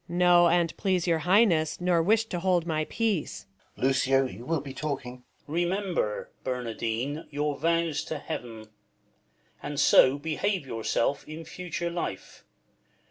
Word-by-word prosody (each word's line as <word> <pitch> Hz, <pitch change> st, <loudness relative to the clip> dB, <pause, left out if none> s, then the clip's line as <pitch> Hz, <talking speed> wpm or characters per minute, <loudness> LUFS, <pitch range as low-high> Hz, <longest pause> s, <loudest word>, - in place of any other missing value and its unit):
Luc. 175 Hz, -, -4 dB
No, 175 Hz, -1 st, +6 dB
an"t 170 Hz, -1 st, +2 dB
please 185 Hz, -3 st, +1 dB
your 165 Hz, -2 st, +2 dB
Highness, 180 Hz, -7 st, +4 dB
Nor 175 Hz, -1 st, +2 dB
wisht 220 Hz, +5 st, +2 dB
to 175 Hz, -, -2 dB
hold 180 Hz, -2 st, +1 dB
my 155 Hz, -2 st, -1 dB
peace. 215 Hz, -7 st, -2 dB, 0.3 s
Balt. -, -, -2 dB
Lucio, 135 Hz, 0 st, +3 dB
you 115 Hz, +1 st, -8 dB
will 165 Hz, -1 st, +1 dB
be 140 Hz, -1 st, -8 dB
talking. 135 Hz, -3 st, -4 dB
Duke. 125 Hz, -, -27 dB, 0.2 s
Remember, 175 Hz, -, -1 dB
Bernardine, 125 Hz, +3 st, -3 dB
your 145 Hz, 0 st, -1 dB
vows 165 Hz, +1 st, 0 dB
to 155 Hz, -, -4 dB
Heaven; 115 Hz, -5 st, -7 dB, 0.9 s
And 145 Hz, -1 st, -4 dB
so 130 Hz, +2 st, +6 dB
behave 160 Hz, +4 st, -1 dB
yourself 115 Hz, +3 st, -1 dB
in 160 Hz, +2 st, -8 dB
future 175 Hz, 0 st, -4 dB
life. 170 Hz, -, -5 dB
160 Hz, 145 wpm, -27 LUFS, 135-175 Hz, 0.9 s, No